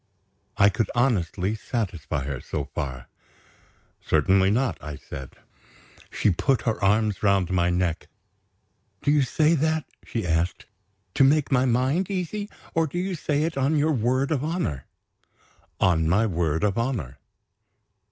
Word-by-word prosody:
I 100 -1 +6
could 105 +1 -1
honestly 105 -5 +1
satisfy 90 - -3
her, 70 -1 -4
so - - -4
far. 65 -3 -4 1.0
"Certainly 95 0 +3
not!" 125 +5 0
I 75 -1 -6
said. 65 -1 -9 0.8
She 105 - +2
put 115 +6 +1
her 110 -4 -1
arms 105 0 +2
round 100 -3 +2
my 90 -1 +2
neck. 90 -2 -1 1.0
"Do 145 - +3
you 150 -1 +4
say 150 +5 +2
that," 160 -1 +1 0.2
she 115 -5 -4
asked, 85 +1 -1 0.5
"to 135 - +4
make 145 +2 +3
my 130 -1 +3
mind 130 +9 +1
easy? 200 +2 -3 0.2
or 165 -1 +2
do 165 - -6
you 185 +2 -1
say 150 -3 -1
it 160 0 -2
on 135 +3 +2
your 155 +1 +2
word 130 +2 +1
of 145 -3 0
honor?" 150 - -2 0.9
"On 80 -3 +3
my 105 +6 +3
word 85 -5 0
of 105 +1 +1
honor." 105 - -3
110 Hz, 145 wpm, -25 LUFS, 90-145 Hz, 1.0 s, I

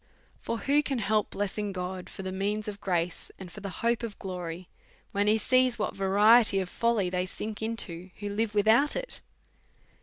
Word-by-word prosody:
For 230 - -3
who 285 +5 +3
can 275 -3 -2
help 215 -1 +1
blessing 205 +1 -2
God 185 0 -5
for 195 - -8
the 190 - -3
means 205 +3 -2
of 205 -1 -6
grace, 175 -2 -1
and 185 -2 -9
for 210 - -9
the 200 - -4 0.2
hope 235 0 +2
of 230 -4 -5
glory, 180 -2 -6 0.4
when 205 +1 +1
he 215 +1 +5
sees 255 +2 +3
what 210 - -2
variety 205 +3 +5
of 185 -2 -3
folly 225 -5 +1
they 180 0 -1
sink 215 +3 -5
into 190 -6 -3
who 205 0 -4
live 210 +1 -1
without 220 +8 +4
it? - - -4
205 Hz, 185 wpm, -28 LUFS, 190-225 Hz, 0.4 s, he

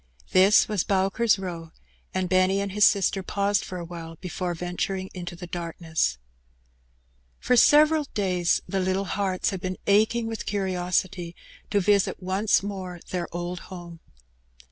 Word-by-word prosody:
This 190 +3 +6
was 210 -5 0
Bowker's 195 +4 +2
Eow, 175 -4 -6 0.4
and 185 -1 -1
Benny 185 +1 +3
and 200 0 -2
his 210 +1 +6
sister 195 -1 +1
paused 200 +1 0
for 185 - -6
awhile 165 -1 -8
before 180 0 -4
venturing 180 +2 -3
into 175 -1 -6
the 180 +1 -8
darkness. 165 - -2 1.2
For 250 - +2
several 300 +4 +5
days 180 -4 +1
the 195 - -1
little 190 +1 0
hearts 190 -1 -1
had 190 -2 -5
been 185 0 -3
aching 220 +3 +3
with 225 -1 -5
curiosity 180 -2 -1 0.3
to 205 - +2
visit 200 0 +2
once 195 +2 +1
more 190 -3 -5
their 180 -2 -2
old 175 +1 -4
home. 175 -2 -9
185 Hz, 145 wpm, -25 LUFS, 175-200 Hz, 1.2 s, This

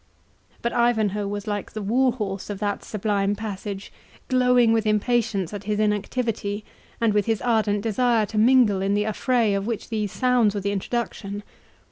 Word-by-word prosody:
But 235 - -1
Ivanhoe 215 -4 +1
was 205 0 -4
like 205 -1 -4
the 215 - -4
war 250 +5 +3
horse 200 -5 -4
of 205 - -3
that 205 0 -2
sublime 205 -1 -1
passage, 200 -2 -6 0.4
glowing 250 -3 +4
with 225 -1 +1
impatience 210 -3 +1
at 205 -1 -6
his 210 0 -1
inactivity, 210 0 -1 0.3
and 230 -2 +2
with 210 0 +1
his 225 -2 +1
ardent 215 -4 +1
desire 230 0 +2
to 215 +1 -2
mingle 225 -4 +5
in 195 +1 +1
the 210 - +2
affray 225 0 +1
of 200 +1 -1
which 230 -4 -4
these 210 -3 -2
sounds 245 -5 +2
were 200 - -2
the 200 +1 -1
introduction. 205 -1 -3
210 Hz, 170 wpm, -24 LUFS, 205-235 Hz, 0.4 s, mingle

